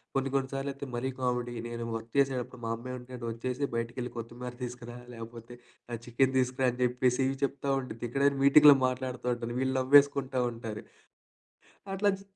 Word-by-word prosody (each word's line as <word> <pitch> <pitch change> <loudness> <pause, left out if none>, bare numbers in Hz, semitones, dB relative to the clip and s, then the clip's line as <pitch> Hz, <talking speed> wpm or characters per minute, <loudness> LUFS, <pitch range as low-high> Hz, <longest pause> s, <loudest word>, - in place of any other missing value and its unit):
కొన్ని 135 0 +1
కొన్ని 135 -1 +1
సార్లయితే 140 0 -3
మరీ 125 +2 -1
కామెడీ 125 -1 -1
నేను 120 0 -5
వర్క్ 115 0 -6
చేసేటప్పుడు 130 -3 0
మా - - -2
అమ్మంటే 125 +1 -7
వచ్చేసి 125 +4 -2
బయటికెళ్ళి 120 +1 -3
కొత్తిమీర 120 +2 -6
తీసుకురా, 120 -1 -7 0.2
లేకపోతే 115 +1 -9 0.4
ఆహ్, 115 - -3
చికెన్ 130 +2 +2
తీసుకురా" 130 0 +2
అని 125 - -10
చెప్పేసి 125 +1 +2
ఇవి 135 0 -2
చెప్తా 140 0 -1
ఉండుద్ది. 120 -2 -8
ఇక్కడేమో 140 +2 +2
మీటింగులో 145 0 +9
మాట్లాడుతా 130 -1 -4
ఉంటుంది. 120 0 -5
వీళ్ళు 130 0 0
నవ్వేసుకుంటా 140 -1 +4
ఉంటారు. 115 -2 -6 1.1
అట్లా 205 +1 +3
చ్ - - -13
125 Hz, 155 wpm, -30 LUFS, 120-135 Hz, 1.1 s, మీటింగులో